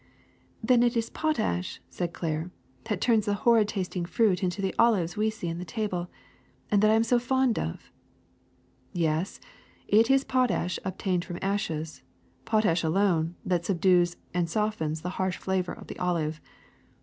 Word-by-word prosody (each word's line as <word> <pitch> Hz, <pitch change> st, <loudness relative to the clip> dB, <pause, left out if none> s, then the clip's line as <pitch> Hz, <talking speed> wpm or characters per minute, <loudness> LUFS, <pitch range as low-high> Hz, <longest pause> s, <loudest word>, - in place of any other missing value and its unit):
^' -, -, -7 dB
^^Then 245 Hz, -1 st, +5 dB
it 240 Hz, 0 st, +2 dB
is 230 Hz, 0 st, -1 dB
potash,'^ 220 Hz, -, -1 dB
said 175 Hz, -2 st, -3 dB
Claire, 160 Hz, 0 st, -3 dB, 0.4 s
^Hhat 210 Hz, -4 st, -2 dB
turns 225 Hz, -4 st, +3 dB
the 205 Hz, -, +2 dB
horrid 225 Hz, +1 st, +4 dB
tasting 185 Hz, -3 st, -3 dB
fruit 185 Hz, +1 st, +2 dB
into 185 Hz, +1 st, -1 dB
the 195 Hz, -1 st, -1 dB
olives 200 Hz, -7 st, +3 dB
we 215 Hz, +1 st, +1 dB
see 215 Hz, -5 st, -6 dB
on 165 Hz, 0 st, -3 dB
the -, -, -4 dB
table, 180 Hz, -1 st, -3 dB, 0.6 s
and 205 Hz, -1 st, +4 dB
that 215 Hz, -, +5 dB
I 220 Hz, -, +5 dB
am 225 Hz, -, +4 dB
so 240 Hz, +1 st, +3 dB
fond 260 Hz, -1 st, +1 dB
of. 80 Hz, -, -5 dB, 0.3 s
' -, -, -38 dB
* -, -, -37 dB
*'Yes, 165 Hz, +1 st, -1 dB, 0.5 s
it 225 Hz, +3 st, +4 dB
is 270 Hz, 0 st, +5 dB
the -, -, -14 dB
potash 250 Hz, -8 st, +1 dB
obtained 185 Hz, -1 st, -1 dB
from 175 Hz, -1 st, -6 dB
ashes, 165 Hz, -6 st, -2 dB, 0.4 s
potash 210 Hz, -7 st, +2 dB
alone, 170 Hz, -1 st, +1 dB
that 175 Hz, -2 st, 0 dB
subdues 175 Hz, -1 st, +3 dB, 0.2 s
and 175 Hz, -1 st, 0 dB
soft 215 Hz, +1 st, -1 dB
ens 155 Hz, 0 st, -2 dB
the 180 Hz, -, -3 dB
harsh 185 Hz, -1 st, 0 dB
flavor 190 Hz, -1 st, -1 dB
of -, -, -11 dB
the -, -, -9 dB
olive. 160 Hz, -4 st, -1 dB
185 Hz, 180 wpm, -27 LUFS, 170-220 Hz, 0.6 s, ^^Then